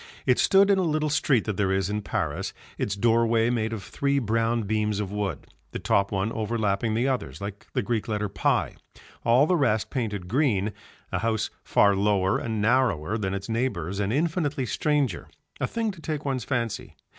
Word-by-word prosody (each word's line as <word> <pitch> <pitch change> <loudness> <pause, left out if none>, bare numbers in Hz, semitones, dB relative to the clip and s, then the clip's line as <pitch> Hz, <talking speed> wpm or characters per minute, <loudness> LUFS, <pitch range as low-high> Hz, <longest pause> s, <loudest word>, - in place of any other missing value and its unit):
It - - +3
stood 195 0 +5
in 195 - +4
a - - +3
little 155 -3 0
street 135 -5 +2
that 105 -3 -3
there 95 -2 +1
is 95 -1 +1
in 105 +1 -2
Paris, - - -2 0.3
its 100 - -1
doorway 115 +2 +3
made 110 -2 0
of 110 -4 -5
three 140 +8 0
brown 115 -1 +1
beams 105 0 0
of 100 -2 -3
wood, 105 -2 -3 0.3
the - - -2
top 100 0 +1
one 100 +2 0
overlapping 110 -1 0
the 120 +4 +1
others 100 - -2
like 100 0 -7
the - - 0
Greek 115 -3 -1
letter 105 -1 -1
pi, - - 0 0.5
all 120 +5 +5
the 180 - +2
rest 115 -9 +1
painted 105 -8 -3
green, 110 -4 +1 0.4
a 95 - 0
house 110 +1 -1
far 100 -1 +4
lower 100 -1 +2
and 110 -2 -3
narrower 110 -7 +2
than 100 -3 -2
its 100 0 -5
neighbours 105 -6 -2
and 100 0 0
infinitely 150 -1 0
stranger, 140 - 0 0.3
a - - 0
thing 225 -2 -1
to 180 -5 -13
take 155 -2 -4
one's 130 -4 -1
fancy. 120 -5 -3
110 Hz, 190 wpm, -26 LUFS, 100-130 Hz, 0.5 s, stood